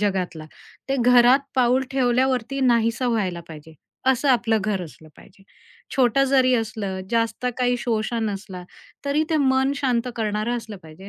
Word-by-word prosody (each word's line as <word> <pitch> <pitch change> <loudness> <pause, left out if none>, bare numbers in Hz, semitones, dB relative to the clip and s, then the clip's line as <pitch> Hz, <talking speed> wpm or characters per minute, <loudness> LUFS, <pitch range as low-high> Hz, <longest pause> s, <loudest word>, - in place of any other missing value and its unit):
जगातला, 185 -6 -2 0.4
ते 275 - 0
घरात 245 +2 +6 0.2
पाऊल 255 0 +3
ठेवल्यावरती 260 0 0
नाहीसा 235 0 +2
व्हायला 190 -7 -1
पाहिजे. 160 0 -12 0.3
असं 265 +2 +2
आपलं 235 -3 +2
घर 210 -3 -1
असलं 160 -1 -12
पाहिजे. 195 - -19 0.5
छोटं 265 +1 +3
जरी 260 -1 +3
असलं, 215 -5 -3
जास्त 230 +1 -1
काही 245 -1 +1
शोशा 230 0 -2
नसला, 195 -4 -5 0.4
तरी 285 +2 +1
ते 320 - +2
मन 265 0 +2
शांत 255 -3 0
करणारं 215 +2 -1
असलं 220 -3 -8
पाहिजे, 160 +5 -13
235 Hz, 145 wpm, -23 LUFS, 210-255 Hz, 0.5 s, घरात